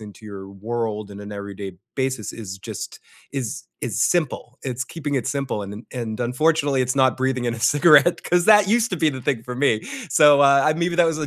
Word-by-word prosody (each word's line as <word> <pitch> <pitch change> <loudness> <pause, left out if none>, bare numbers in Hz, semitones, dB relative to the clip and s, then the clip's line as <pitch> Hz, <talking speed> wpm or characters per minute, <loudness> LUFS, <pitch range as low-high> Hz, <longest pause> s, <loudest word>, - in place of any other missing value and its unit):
into 105 0 -12
your 100 -2 -9
world 110 0 -4
in 100 - -10
an 105 0 -8
everyday 100 -1 -7 0.2
basis 130 -5 -2
is 95 -4 -8
just - - -8 0.3
is 130 -6 -4 0.2
is - - -3
simple. 145 -6 -1
It's 125 -1 -3
keeping 145 -2 -5
it 130 -5 -1
simple, 135 -7 -2
and 100 - -7
un 105 +4 -10
and 115 -3 -5
unfortunately, 140 +2 +1
it's 125 +2 -2
not 130 -3 +3
breathing 130 -1 -1
in 120 - -1
a 115 - -8
cigarette 150 +5 +5
'cause 175 0 +1
that 210 -1 +6
used 235 +1 +2
to 185 - -2
be 160 -1 +2
the 130 -2 -7
thing 120 -4 -1
for 125 +1 -7
me. 125 -4 +1 0.3
So, 145 0 +6
uh, 140 +2 +5
maybe 170 +1 -1
that 175 -1 +5
was 160 -1 -1
a 150 - -3
130 Hz, 220 wpm, -22 LUFS, 110-150 Hz, 0.3 s, that